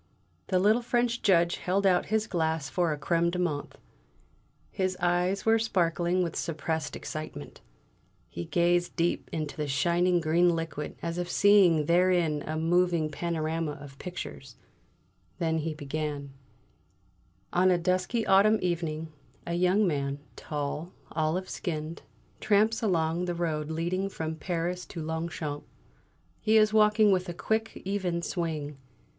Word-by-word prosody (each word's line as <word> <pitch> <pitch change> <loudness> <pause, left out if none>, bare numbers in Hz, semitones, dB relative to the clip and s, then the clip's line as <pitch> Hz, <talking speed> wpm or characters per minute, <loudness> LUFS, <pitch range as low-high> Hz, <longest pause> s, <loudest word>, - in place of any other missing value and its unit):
The 185 - +2
little 210 +6 +4
French 240 0 0
Judge 170 -4 +3
held 195 +2 0
out 180 -2 +3
his 220 +1 +1
glass 160 -7 -1
for 175 -3 +1
a 150 - -2
crème 170 +4 +1
de 175 - -3
menthe; 160 -5 -2 1.0
his 185 -1 -1
eyes 180 +2 +1
were 225 0 +4
sparkling 180 -4 +1
with 170 -2 -3
suppressed 160 -1 -2
excitement; 155 - -7 0.7
he 85 0 -6
gazed 175 0 +1
deep 170 0 0
into 155 -2 -3
the 150 -1 -3
shining 175 +6 +2
green 170 +2 +3
liquid 160 -3 -4
as 170 +1 -2
if 175 0 -3
seeing 190 -6 +5
therein 170 -3 +2
a 155 +1 -2
moving 170 -1 +2
panorama 160 -1 -2
of 140 -1 -12
pictures, 135 -7 -7 0.8
then 160 -1 0
he 155 0 -3
began: 145 -1 -4 1.2
On 185 +1 +4
a 180 - +4
dusky 185 +6 0
autumn 205 +3 +5
evening, 160 -3 -2 0.3
a 170 - -3
young 180 +4 +3
man, 140 -4 -1 0.2
tall, 150 +3 -4 0.2
olive 160 +4 -1
skinned, 160 -2 -4 0.4
tramps 215 +2 +2
along 170 -4 +1
the 175 -1 -2
road 155 -3 -2
leading 175 +4 -1
from 160 -4 -4
Paris 175 +1 -3
to 170 - -7
Longchamps. 160 -2 -4 0.7
He 220 +1 +3
is 215 0 +4
walking 210 -1 +5
with 185 -1 +1
a 175 - -5
quick, 220 +5 -2
even 185 -3 -1
swing. 155 -6 -3
170 Hz, 140 wpm, -28 LUFS, 155-185 Hz, 1.2 s, seeing